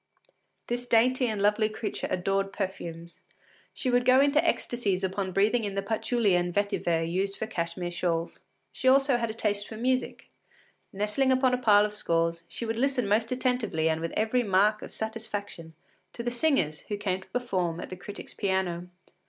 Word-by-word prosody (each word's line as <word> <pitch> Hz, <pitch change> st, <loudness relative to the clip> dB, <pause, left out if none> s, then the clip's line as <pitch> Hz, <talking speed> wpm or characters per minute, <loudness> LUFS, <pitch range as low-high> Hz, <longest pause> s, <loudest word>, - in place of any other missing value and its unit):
This 245 Hz, +1 st, -2 dB
dainty 250 Hz, +2 st, +3 dB
and 215 Hz, -3 st, -2 dB
lovely 210 Hz, +2 st, +3 dB
creature 215 Hz, -1 st, -4 dB
adored 195 Hz, +2 st, 0 dB
perfumes. 170 Hz, -4 st, -6 dB, 0.5 s
She 255 Hz, -, -2 dB
would 245 Hz, 0 st, +3 dB
go 255 Hz, +1 st, +5 dB
into 285 Hz, +3 st, +4 dB
ecstasies 225 Hz, -, 0 dB
on 190 Hz, 0 st, -2 dB
breathing 210 Hz, +5 st, +2 dB
in 200 Hz, -2 st, -3 dB
the 195 Hz, -, -1 dB
patchouli 220 Hz, 0 st, +1 dB
and 175 Hz, 0 st, +1 dB
vetiver 175 Hz, -4 st, 0 dB
used 195 Hz, +3 st, -1 dB
for -, -, -2 dB
Cashmere 175 Hz, -4 st, -3 dB
shawls. 170 Hz, -1 st, -2 dB, 0.3 s
She 260 Hz, -, -3 dB
had 260 Hz, -, +8 dB
also 275 Hz, -1 st, +3 dB
a 225 Hz, -1 st, -1 dB
taste 205 Hz, -2 st, -1 dB
for 220 Hz, -, -8 dB
music. 255 Hz, +2 st, -1 dB, 0.6 s
Nestling 210 Hz, +7 st, +1 dB
upon 260 Hz, -1 st, +3 dB
a -, -, +3 dB
pile 210 Hz, -3 st, +6 dB
of 210 Hz, -, -4 dB
scores, 165 Hz, -4 st, -1 dB
she 235 Hz, -, -6 dB
would 225 Hz, 0 st, -2 dB
listen 260 Hz, -3 st, +1 dB
most 220 Hz, +3 st, +1 dB
attentively 250 Hz, -11 st, 0 dB
and 160 Hz, 0 st, -1 dB
with 165 Hz, -, -3 dB
every 220 Hz, +3 st, +1 dB
mark 210 Hz, 0 st, +3 dB
of -, -, -8 dB
satisfaction 205 Hz, -7 st, -5 dB, 0.4 s
to 235 Hz, -, -6 dB
the 240 Hz, -, -1 dB
singers 240 Hz, -, +1 dB
who 205 Hz, -, -3 dB
came 190 Hz, -2 st, -2 dB
to -, -, -16 dB
perform 185 Hz, -9 st, -2 dB
at -, -, -7 dB
the -, -, -4 dB
critic’s 200 Hz, +3 st, -9 dB
piano. 185 Hz, -3 st, -1 dB
210 Hz, 180 wpm, -28 LUFS, 185-240 Hz, 0.6 s, had